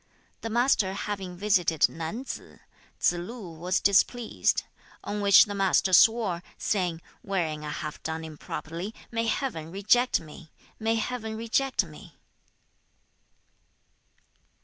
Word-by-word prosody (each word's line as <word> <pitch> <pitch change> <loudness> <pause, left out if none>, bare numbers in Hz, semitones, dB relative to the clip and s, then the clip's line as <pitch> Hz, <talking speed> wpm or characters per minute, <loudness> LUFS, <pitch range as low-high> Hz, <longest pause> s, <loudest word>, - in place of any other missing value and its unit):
The 225 - -4
Master 225 -5 +2
having 195 -3 -5
visited 180 -6 +3
Nan 165 +11 -5
tsze, - - -8 0.4
Tsze 175 - +2
lu 215 -3 -8
was 175 +3 0
displeased, 215 +4 +2 0.4
on 205 0 -3
which 200 -1 +8
the 205 - -5
Master 195 -1 +2
swore, 210 -3 +5 0.2
saying, 175 -5 -1 0.2
'Wherein 165 -6 -2
I 150 - -4
have 150 0 -5
done 160 0 -4
improperly, 165 +5 -6 0.2
may 230 -1 -1
Heaven 220 - -2
reject 215 +7 +3
me, 155 0 -13 0.3
may 225 +1 +1
Heaven 220 -1 -3
reject 245 +4 +1
me!' - - -13
195 Hz, 120 wpm, -27 LUFS, 170-225 Hz, 0.4 s, which